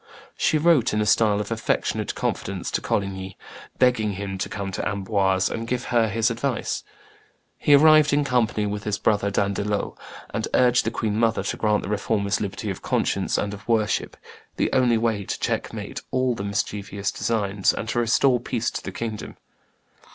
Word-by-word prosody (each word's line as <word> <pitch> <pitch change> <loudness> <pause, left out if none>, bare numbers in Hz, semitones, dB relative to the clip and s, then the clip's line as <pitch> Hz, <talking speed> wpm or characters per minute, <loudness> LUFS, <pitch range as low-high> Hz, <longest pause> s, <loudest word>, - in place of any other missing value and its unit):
She 155 - +2
wrote, 155 -8 +3
in 105 - +1
a - - +1
style 105 -1 +3
of 105 +1 -4
affectionate 115 - -1
confidence, - - -3
to - - -1
Coligny, 95 -1 -3 0.4
begging 115 -5 +2
him 95 0 -5
to - - -2
come 100 -1 -4
to - - -3
Amboise 95 -2 +1
and 115 0 -4
give 125 0 -1
her 115 -2 +4
his 115 +3 +1
advice. 120 +1 -2 0.7
He 145 - +4
arrived 155 0 +6
in 145 +1 +3
company 120 -5 +1
with 105 0 -3
his 105 -1 -1
brother 105 -2 +1
D'Andelot, 100 +1 -1 0.4
and - - -1
urged 125 -1 +4
the - - +2
queen 110 -2 -2
mother 115 -1 +2
to - - -2
grant 105 -1 +1
the - - -5
Reformers 100 -1 0
liberty 100 0 -3
of 95 - -7
conscience - - 0
and 100 0 -2
of 105 +1 -11
worship, 110 -3 0 0.4
the - - 0
only 125 -3 +4
way 110 -3 0
to - - -4
checkmate - - -3
all 130 -1 +1
the 105 - -5
mischievous 100 -1 -2
designs 100 -4 0
and 110 - -5
to 120 - 0
restore 120 +2 +3
peace 120 -1 -2
to - - -5
the - - -6
kingdom. 110 -2 -5
110 Hz, 180 wpm, -24 LUFS, 100-120 Hz, 0.7 s, arrived